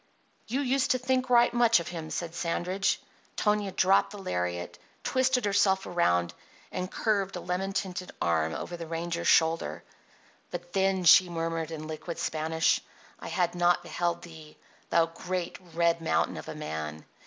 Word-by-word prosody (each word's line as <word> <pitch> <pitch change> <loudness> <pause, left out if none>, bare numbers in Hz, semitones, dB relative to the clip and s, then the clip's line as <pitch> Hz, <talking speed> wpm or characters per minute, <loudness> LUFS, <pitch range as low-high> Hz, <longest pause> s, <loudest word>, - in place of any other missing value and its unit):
"You 260 +5 -1
used 270 0 +1
to 255 - +3
think 255 0 0
right 240 -1 +5
much 235 -4 +5
of 170 - -6
him," 165 -3 -6
said 170 0 -4
Sandridge. 180 +3 0 0.4
Tonia 210 -2 +1
dropped 190 +1 +3
the 205 - -9
lariat, 90 - -3 0.2
twisted 260 -2 +2
herself 195 -1 +3
around, 85 - +1 0.4
and 185 0 -3
curved 200 -3 0
a - - -3
lemon 180 +2 -2
tinted 185 -2 -3
arm 80 -1 +1
over 175 - -5
the 170 -1 -7
ranger's 170 +1 -3
shoulder. 165 0 +3 0.7
"But 175 0 -7
then," 190 -1 +2
she 180 +1 +7
murmured 165 -1 -2
in 155 -1 -6
liquid 160 +2 -6
Spanish, 160 +1 +1 0.4
"I - - -8
had 175 -2 0
not 175 0 +2
beheld 175 0 -2
thee, 160 -3 -12 0.3
thou 165 - +4
great, 175 +1 -4 0.2
red 170 0 +2
mountain 85 - +1
of - - -8
a - - -6
man! 80 0 -5
175 Hz, 160 wpm, -28 LUFS, 165-195 Hz, 0.7 s, she